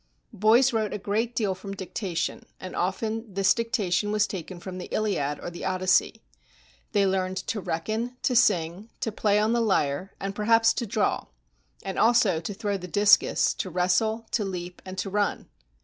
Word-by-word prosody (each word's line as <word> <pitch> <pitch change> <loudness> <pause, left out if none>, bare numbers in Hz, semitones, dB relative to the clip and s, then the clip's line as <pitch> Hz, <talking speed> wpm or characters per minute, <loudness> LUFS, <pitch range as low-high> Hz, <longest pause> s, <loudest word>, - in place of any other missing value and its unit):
Boys 225 +5 +4
wrote 220 -2 0
a - - -2
great 220 +4 -2
deal 205 -4 +1
from 195 +2 -8
dictation, 190 -2 -3 0.2
and 185 - -7
often 220 +4 -2
this 195 0 +3
dicta 230 -5 -2
tion 205 +4 +1
was 210 0 +3
taken 185 -2 -7
from 185 +1 -7
the 180 - -6
"Iliad" 150 -10 -1
or - - -6
the 175 - -8
"Odyssey." 185 +4 +1 0.7
They 205 -2 +3
learned 190 -1 0
to 210 +2 -3
reckon, 220 +9 -3
to 250 - +1
sing, 195 -3 +2
to 225 - -1
play 205 -1 +1
on 215 +2 +2
the 235 - +2
lyre, 190 -4 0
and 195 0 -3
perhaps 225 +2 +4
to 235 - -3
draw; 205 +1 0 0.6
and 190 -1 -4
also 225 -7 +4
to 170 +5 -5
throw 205 -1 -2
the 180 -1 -8
discus, 205 +3 +4
to 185 - -4
wrestle, 185 +6 +1
to 220 - +1
leap, 180 -2 -6
and 185 0 -8
to 195 - -3
run. 205 0 -1
200 Hz, 180 wpm, -26 LUFS, 185-220 Hz, 0.7 s, Boys